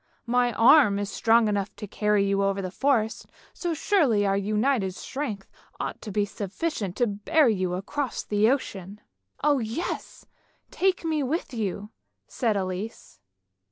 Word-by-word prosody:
My 245 0 +2
arm 235 -3 +6
is 205 0 -3
strong 225 0 +3
enough 205 -1 -2
to - - -7
carry 210 0 +1
you 200 0 +1
over 195 0 0
the 185 -2 -4
forest, 230 -2 0 0.3
so 345 -2 -3
surely 290 - +2
our 195 0 +2
united 210 0 0
strength 225 -8 -5 0.3
ought - - -4
to 215 - -7
be 205 +1 +1
sufficient 205 - -4
to 245 - +2
bear 215 +8 +2
you 185 -5 0
across 260 +8 -3
the 210 +1 +2
ocean." 205 -7 -3 0.2
" 95 0 -31
Oh 290 -2 +3
yes! 230 +10 -4 0.5
take 370 -2 0
me 315 -2 0
with 285 +2 -2
you," 210 -2 -3 0.4
said 225 -5 0
Elise. 185 - -5
215 Hz, 155 wpm, -26 LUFS, 200-265 Hz, 0.5 s, arm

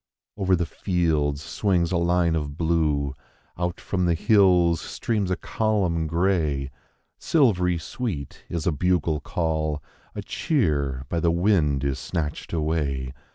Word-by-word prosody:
/ - - -70
& - - -23
¥ - - -6
Over 95 -1 +4
the 85 0 0
fields 80 -5 0
swines 90 -2 0
a 90 - +2
line 85 -1 +2
of 75 -2 -3
blue; 75 -5 +1 0.4
out 90 +4 -2
from 90 -6 -1
the 85 -1 +2
hills 90 -4 +4
streams 105 -5 -2
a 90 - +1
column 95 -7 0
gray; 80 -5 0 0.5
Silvery 90 - +2
sweet 80 - -5
is 85 -3 -3
a 90 - +3
bugle 80 -1 +1
call; 80 -1 -1 0.4
a - - -4
cheer 70 - 0
by 85 - -1
the 85 - +2
wind 85 -6 +2
is 70 -1 -1
snatched 75 +2 -4
away. 75 -5 -1
85 Hz, 150 wpm, -25 LUFS, 75-90 Hz, 0.5 s, Over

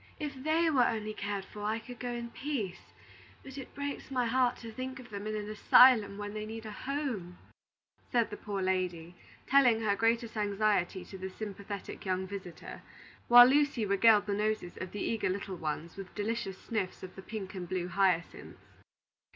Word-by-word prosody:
"If 300 -2 -3
they 315 +5 +1
were 255 -5 +4
only 215 -1 -2
cared 200 -1 -4
for, 210 - -10
I 215 +2 0
could 245 +1 -10
go 245 - -3
in 235 -1 -5
peace; 240 -12 -4 0.5
but 265 - -10
it 270 -2 -9
breaks 285 0 -5
my 255 -2 0
heart 250 +1 +2
to 230 -1 -9
think 260 +3 -6
of 245 -3 -12
them 200 +1 -5
in 215 - -2
an 210 -1 -4
asylum, 215 -1 +6
when 205 0 -5
they 215 0 -4
need 220 +1 -7
a 215 - -6
home," 240 -9 -4 0.7
said 235 -3 +2
the - - -4
poor 200 -2 -4
lady, 180 -3 -1 0.3
telling 250 -5 +5
her 205 -2 +2
greatest 230 +2 +1
anxiety 205 -3 0
to 190 +1 -10
this 190 0 -6
sympathetic 200 -1 -6
young 185 -1 -1
visitor; 185 -3 -8 0.5
while 245 0 +11
Lucy 270 -3 +3
regaled 205 +1 +5
the 205 - -1
noses 210 -3 -1
of 185 -1 -6
the 205 - -5
eager 225 -4 0
little 190 0 -3
ones 160 +1 -4
with 195 -2 -9
delicious 210 -2 -2
sniffs 205 -4 -4
of 185 - -9
the 190 - -8
pink 195 -2 -6
and 180 -3 -6
blue 185 -1 -2
hyacinths. 180 -2 0
210 Hz, 185 wpm, -31 LUFS, 190-240 Hz, 0.7 s, while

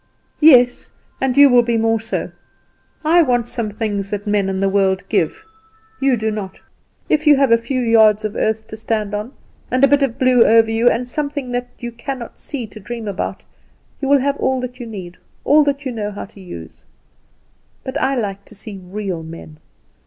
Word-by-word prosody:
"Yes; 250 -6 +5 0.3
and 265 -1 0
you 285 0 +9
will 245 -2 +5
be 235 -1 0
more 225 0 +1
so. 225 - -3 0.7
I 340 +3 +5
want 245 -6 +1
things 210 -4 -3
that 205 0 -4
men 205 -2 +1
and 190 0 -2
the - - +3
world 195 -1 +1
give, 430 0 -1 0.5
you 265 -2 +2
do 220 0 -1
not. 205 -3 -6 0.5
If 310 0 +1
you 295 - +8
have 275 -3 +3
a - - +8
few 235 +3 -2
yards 220 -2 +4
of 215 - -4
earth 220 0 -1
to 220 - -7
stand 215 -2 -2
on, 210 +4 -4 0.4
and 255 +1 +1
a - - +8
bit 285 +1 +3
of 265 -4 0
blue 255 -2 +5
over 225 0 +4
you, 230 +2 +3
and 245 +1 -1
something 285 -1 -3
that 245 0 -2
you 240 0 -6
cannot 240 +1 -7
see 270 -5 -5
to 215 0 -12
dream 230 +1 -7
about, 200 -2 -4 0.6
you 275 0 0
have 280 0 +2
all 260 0 0
that 250 0 -7
you 240 - -6
need, 185 -5 -8 0.3
all 300 +1 +5
that 285 0 -1
you 260 - -2
know 215 -3 -3
how 205 - -7
to 200 -1 -16
use. 85 - -10 1.0
But 260 - -6
I 270 +1 +1
like 200 -5 -3
to 215 - -14
see 200 -1 -8
real 190 -2 -4
men. 160 -1 -11
230 Hz, 195 wpm, -19 LUFS, 210-260 Hz, 1.0 s, you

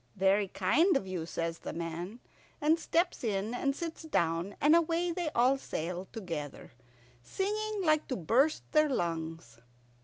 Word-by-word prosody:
"Very 195 +2 +3
kind 275 - +3
of 200 - -4
you," 180 -4 -4
says 165 -1 -3
the - - -6
man, 170 +7 -5 0.4
and 315 +3 +3
steps 340 0 0
in 210 0 -1
and 275 +2 0
sits 330 0 -5
down, 175 - 0
and 300 +3 +5
away 335 +1 +2
they 340 -2 -2
all 255 +3 +4
sail 180 -3 -4
together, 165 - -6 0.5
singing 415 - -2
like 310 -2 +2
to 260 - -2
burst 250 - +2
their 305 -1 +4
lungs. 165 - -3
230 Hz, 150 wpm, -31 LUFS, -, 0.5 s, and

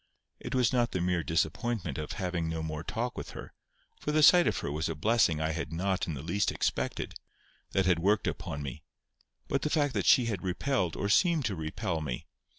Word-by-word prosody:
It - - -5
was 125 0 +3
not 120 -2 +1
the 95 - 0
mere 90 0 +1
disappointment 80 - -1
of 75 - -4
having 90 -4 -2
no 80 0 -3
more 80 0 -4
talk 120 +7 -3
with - - -6
her, - - -9 0.5
for 150 - -2
the 155 0 +3
sight 175 +3 +8
of - - +1
her - - -3
was 80 +2 -1
a 80 - -3
blessing 95 -2 +2
I 80 0 0
had 75 -2 -4
not 95 +3 -1
in 80 - -3
the 70 - -7
least 100 +5 0
expected, - - -2 0.6
that 95 -1 +2
had 90 -2 +3
worked 100 +4 +2
upon 70 0 -3
me, 70 -4 -6 0.7
but 140 - 0
the 150 - -1
fact 145 -3 +1
that - - -1
she 125 - +6
had 105 -6 -2
repelled 95 - -1
or 100 - -1
seemed 160 - +3
to 105 -4 -1
repel 80 +2 -3
me. 65 -5 -4
90 Hz, 215 wpm, -30 LUFS, 80-120 Hz, 0.7 s, sight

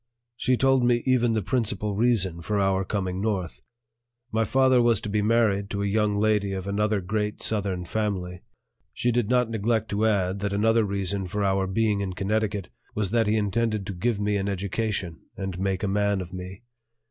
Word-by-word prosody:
She 125 +1 +1
told 135 0 +3
me 120 -1 +2
even 120 -3 +3
the 110 -2 0
principal 105 -1 -1
reason 100 -7 +2
for 105 +4 -1
our 95 -1 +2
coming 95 -1 -2
north. 100 -6 -2 0.7
My 110 0 +1
father 130 +2 +4
was 120 -2 +4
about - - -6
to 105 - -4
be 105 +1 +1
married 105 -2 +2
to 100 0 -2
a - - 0
young 105 0 +1
lady 105 -2 +1
of 95 -1 -4
another 105 +1 0
great 105 +3 -2
Southern 100 -4 -1
family; 90 -3 -3 0.5
She 120 - +1
did 120 -2 0
not 125 -2 +2
neglect 110 0 0
to 105 +2 +1
add 100 -2 0
that 100 0 -2
another 110 +2 +3
reason 100 -1 -2
for 105 +3 -2
our 95 -1 +1
being 105 +1 +1
in 95 -2 -3
Connecticut 105 +1 -1 0.3
was 100 -3 -1
that 115 -2 +2
he 110 +1 +2
intended 110 0 0
to 100 - -4
give 100 +4 -1
me 105 0 0
an 100 0 -2
education 100 -3 -2 0.2
and 95 -2 -4
make 95 0 -1
a - - +1
man 100 0 +1
of 90 0 -7
me. 95 +3 -8
105 Hz, 195 wpm, -25 LUFS, 95-110 Hz, 0.7 s, father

